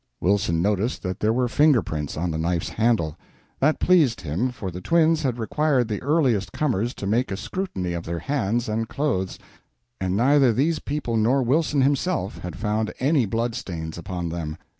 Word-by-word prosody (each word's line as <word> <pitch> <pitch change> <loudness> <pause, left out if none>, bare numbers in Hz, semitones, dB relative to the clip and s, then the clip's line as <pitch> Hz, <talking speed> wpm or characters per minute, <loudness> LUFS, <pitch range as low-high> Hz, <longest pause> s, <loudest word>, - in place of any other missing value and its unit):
Wilson 90 -3 +1
noticed 105 +4 0
that 95 -1 -3
there 110 - +2
were 125 +2 +1
finger 145 -1 +4
prints 75 -2 -4
on 85 +2 -1
the 80 - -2
knife 85 +1 -1
handle. 110 -9 +1 0.4
That 155 +3 +2
pleased 150 - +3
him, 85 - -1
for 105 -6 -6
the 90 +2 -7
twins 160 - +3
had 130 -5 -1
required 130 +2 +1
the 105 -2 -3
earliest 130 -8 +1
comers 120 -5 -1
to - - -6
make 115 +6 +1
a 95 - -3
scrutiny 100 - -3
of 85 -1 -4
their 85 +1 -3
hands 120 - -1
and 110 +1 -2
clothes, 125 -11 -1 0.6
and 95 0 -1
neither 135 +2 +4
these 150 +8 +1
people 140 -6 -2
nor 125 +5 +3
Wilson 145 +3 +2
himself 140 - 0
had 90 - -6
found 105 +1 -1
any 135 -3 +2
blood 115 +3 -1
stains 80 -6 -5
upon 85 0 -4
them. 80 -2 -4
115 Hz, 185 wpm, -24 LUFS, 90-140 Hz, 0.6 s, finger